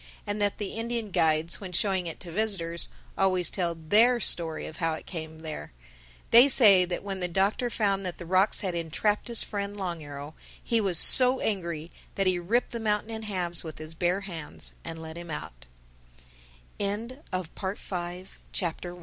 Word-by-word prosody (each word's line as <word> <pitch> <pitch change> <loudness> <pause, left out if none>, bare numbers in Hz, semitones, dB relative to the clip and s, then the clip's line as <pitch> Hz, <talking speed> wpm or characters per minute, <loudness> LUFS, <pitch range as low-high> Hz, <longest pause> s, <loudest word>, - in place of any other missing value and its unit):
And 205 +1 -3
that 205 -1 +1
the 205 -2 -4
Indian 230 -2 -3
guides, 160 +1 +1
when 185 -2 -7
showing 190 -1 0
it 165 - -6
to 175 - -7
visitors, 170 -4 -1 0.3
always 185 -3 +1
tell 175 -3 -1
their 215 +10 +4
story 165 -6 0
of 160 - -9
how 165 -2 0
it 155 - -7
came 160 -2 -7
there. 155 - -7 0.6
They 240 +4 +9
say 205 -9 +8
that 175 +1 -4
when 195 -1 -4
the 180 - -1
Doctor 195 +7 0
found 200 -4 0
that 180 -2 -5
the 175 - -8
rocks 190 +4 +2
had 185 -3 -2
entrapped 170 +7 -1
his 235 -2 -1
friend, 205 0 -5
Long 175 -4 -4
Arrow, 145 0 -8 0.3
he 230 -2 +1
was 190 -4 +1
so 255 +7 +8
angry 170 -5 -3 0.2
that 195 - +1
he 185 -1 +2
ripped 225 +8 0
the 235 - -4
mountain 215 0 -1
in 220 0 -5
halves 180 -5 -1
with 160 -2 -8
his 155 +1 -8
bare 175 +3 0
hands 170 -6 -7
185 Hz, 160 wpm, -27 LUFS, 170-210 Hz, 0.6 s, They